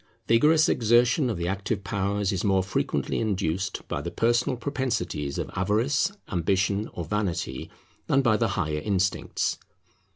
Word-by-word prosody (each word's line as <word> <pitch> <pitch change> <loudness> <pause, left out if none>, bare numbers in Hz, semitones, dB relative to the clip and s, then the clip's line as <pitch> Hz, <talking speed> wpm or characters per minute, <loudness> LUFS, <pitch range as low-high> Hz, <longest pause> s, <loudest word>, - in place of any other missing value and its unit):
Vigorous 150 +7 +5
exertion 120 +4 +3
of 110 - -2
the 85 0 -2
active 100 +2 -2
powers 100 0 -1
is 95 -3 -2
more 95 -2 +2
frequently 95 - -1
induced 95 -4 -2
by - - -3
the - - -4
personal 120 +2 +1
propensities 115 - -2
of - - -4
avarice, 115 - +1 0.2
ambition, 100 +4 0
or 85 - -5
vanity, 85 -8 -2 0.4
than 135 +1 +3
by 120 -4 +4
the 115 +1 +1
higher 75 -4 -1
instincts. 95 +1 -1
100 Hz, 140 wpm, -26 LUFS, 95-120 Hz, 0.4 s, Vigorous